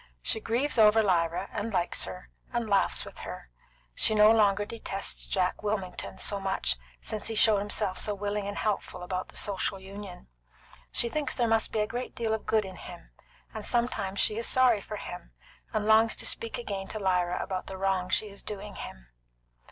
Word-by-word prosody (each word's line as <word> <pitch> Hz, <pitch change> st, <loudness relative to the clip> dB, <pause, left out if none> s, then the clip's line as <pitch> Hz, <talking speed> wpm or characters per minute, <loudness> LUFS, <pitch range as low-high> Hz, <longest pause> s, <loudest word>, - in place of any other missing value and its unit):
She -, -, +1 dB
grieves 240 Hz, +4 st, +1 dB
over 220 Hz, +1 st, +7 dB
Lyra, 175 Hz, -1 st, +1 dB
and 220 Hz, +1 st, -3 dB
likes 180 Hz, -3 st, +2 dB
her, 180 Hz, -, -9 dB, 0.2 s
and 235 Hz, -2 st, -1 dB
laughs 200 Hz, -2 st, +2 dB
with -, -, -10 dB
her; -, -, -8 dB, 0.4 s
she 215 Hz, -, +4 dB
no 210 Hz, +1 st, +8 dB
longer 205 Hz, -2 st, +4 dB
detests 200 Hz, -3 st, -4 dB
Jack 180 Hz, -1 st, 0 dB
Wilmington 205 Hz, -4 st, -3 dB
so 200 Hz, -, +1 dB
much 190 Hz, -, 0 dB, 0.2 s
since 215 Hz, -, -4 dB
he 225 Hz, -, -2 dB
showed 215 Hz, -1 st, +5 dB
himself 205 Hz, -1 st, 0 dB
so 210 Hz, -1 st, 0 dB
willing 205 Hz, 0 st, -2 dB
and 205 Hz, -, -4 dB
helpful 195 Hz, -3 st, -2 dB
about 185 Hz, +1 st, -3 dB
the -, -, -10 dB
Social 195 Hz, -1 st, 0 dB
Union; 195 Hz, -, -9 dB, 0.6 s
she 235 Hz, -, +1 dB
thinks 295 Hz, +5 st, -2 dB
there 240 Hz, -2 st, +2 dB
must 225 Hz, 0 st, +2 dB
be 215 Hz, -, +1 dB
a -, -, +2 dB
great 245 Hz, +4 st, -5 dB
deal 225 Hz, -2 st, 0 dB
of 220 Hz, -, -3 dB
good 215 Hz, -2 st, +3 dB
in 190 Hz, -1 st, -8 dB
him, 175 Hz, -1 st, -11 dB, 0.4 s
and 220 Hz, -, -5 dB
sometimes 220 Hz, -5 st, 0 dB
she 215 Hz, -, +2 dB
is 230 Hz, -, 0 dB
sorry 250 Hz, -5 st, +4 dB
for 210 Hz, -, -6 dB
him, 180 Hz, -3 st, -8 dB, 0.4 s
and 215 Hz, -1 st, -1 dB
longs 220 Hz, +1 st, +5 dB
to -, -, -3 dB
speak 230 Hz, -, -1 dB
again 200 Hz, -5 st, -4 dB
to 215 Hz, -, -5 dB
Lyra 180 Hz, -3 st, +1 dB
about 185 Hz, -1 st, -3 dB
the 190 Hz, -, -6 dB
wrong 190 Hz, -1 st, 0 dB
she 210 Hz, +4 st, +2 dB
is 200 Hz, -1 st, -10 dB
doing 205 Hz, 0 st, -6 dB
him. -, -, -9 dB
205 Hz, 195 wpm, -29 LUFS, 190-220 Hz, 0.6 s, no